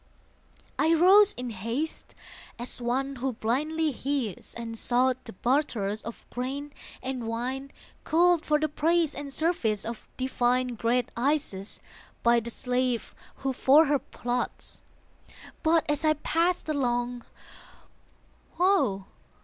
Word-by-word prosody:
I 325 +1 +4
rose 395 +5 +7
in 250 -1 -5
haste, 230 +10 -4 0.4
as 245 +1 -6
one 265 +3 -1
who 260 +1 -1
blindly 300 +8 0
hears, 265 -6 -3
And 230 -1 -5
sought 255 +2 +1
the 225 - -8
barterers 220 -3 0
of 230 - -9
grain 275 +4 -4 0.3
and 255 -3 -3
wine 255 +4 -3 0.3
Culled 345 0 +4
for 300 0 +2
the 310 - +1
praise 320 +1 +1
and 280 0 -6
service 270 - 0
of 230 0 -7
divine 255 -1 +1
Great 240 +1 0
Isis, 245 -7 -1 0.4
by 235 0 +5
the 230 +1 -6
slave 250 0 -1 0.2
who 270 0 -2
for 280 +5 +6
her 290 -1 +2
plods. 245 0 -4 0.8
But 320 0 +3
as 295 0 0
I 310 -1 +5
passed 335 +4 0
along, 245 -4 -1 1.3
woe! 280 - +2
260 Hz, 125 wpm, -28 LUFS, 235-305 Hz, 1.3 s, rose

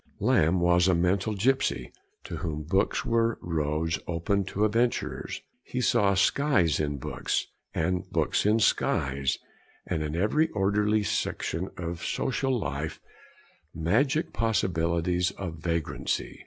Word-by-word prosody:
Lamb 85 +4 +3
was 85 +1 +4
a 95 - +4
mental 95 +5 +1
gipsy, 130 +7 +1 0.3
to - - -6
whom 75 -2 -3
books 95 +6 0
were 115 0 +2
roads 80 -1 -1
open 95 +4 0
to 100 +3 0
adventures; 115 +3 -1 0.2
he 125 - -4
saw 105 -5 +3
skies 95 - +3
in 75 -2 -1
books, 65 - -2 0.3
and 90 +3 -1
books - - +1
in 105 +2 +4
skies, 70 - +1 0.5
and 80 -3 -2
in 75 0 -3
every 130 - +2
orderly 105 +1 +2
section 95 -2 -2
of 85 -1 -5
social 135 0 0
life 75 -2 -4 0.8
magic 130 - +1
possibilities 90 -4 +1
of 85 -4 -5
vagrancy. 85 -1 -2
90 Hz, 125 wpm, -27 LUFS, 80-105 Hz, 0.8 s, was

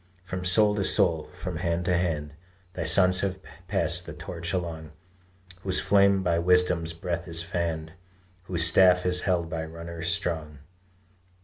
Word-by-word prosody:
From 90 0 -5
soul 105 +3 +3
to 100 - 0
soul, 80 -4 +2
from 90 -3 -5
hand 85 0 -2
to 90 0 +1
hand 80 -4 -2 0.4
Thy 85 - -4
sons 90 +2 +4
have 95 -1 -2 0.3
passed 90 -2 +1
that 80 -2 -8
torch 85 0 -5
along, 80 -4 -4 0.7
Whose 95 -1 +1
flame 100 -1 +3
by 85 -2 +1
Wisdom's 90 -1 +2
breath 85 +1 -4
is 85 0 -3
fanned 80 -2 -3 0.5
Whose 85 -2 +2
staff 90 +1 +5
is 90 0 +1
held 85 -2 +1
by 80 0 -4
runners 85 +1 -7
strong. 80 -5 -1
85 Hz, 150 wpm, -26 LUFS, 85-90 Hz, 0.7 s, staff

